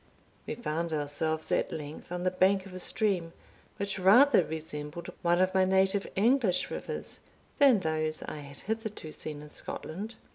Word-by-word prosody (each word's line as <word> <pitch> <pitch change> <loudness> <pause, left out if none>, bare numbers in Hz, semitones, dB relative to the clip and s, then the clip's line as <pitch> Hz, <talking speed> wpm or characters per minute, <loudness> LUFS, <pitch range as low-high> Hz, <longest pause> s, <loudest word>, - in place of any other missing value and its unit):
We - - -3
found 165 -6 -2
ourselves 155 +2 -1
at - - +1
length 155 +2 -7
on 180 0 -3
the 185 - +2
bank 190 +1 +3
of 195 - -11
a 185 - -6
stream, 180 -3 0 0.4
which 200 -1 -3
rather 210 +4 +7
resembled 160 +2 -6
one 175 0 +3
of 185 0 +3
my 190 0 +4
native 190 +1 +2
English 220 -2 +2
rivers - - -6 0.4
than 265 -8 +6
those 155 -1 -1
I - - -6
had 140 -1 -9
hitherto 220 -6 -4
seen 150 -1 -4
in 150 - -12
Scotland. 205 +11 -6
180 Hz, 160 wpm, -30 LUFS, 155-195 Hz, 0.4 s, rather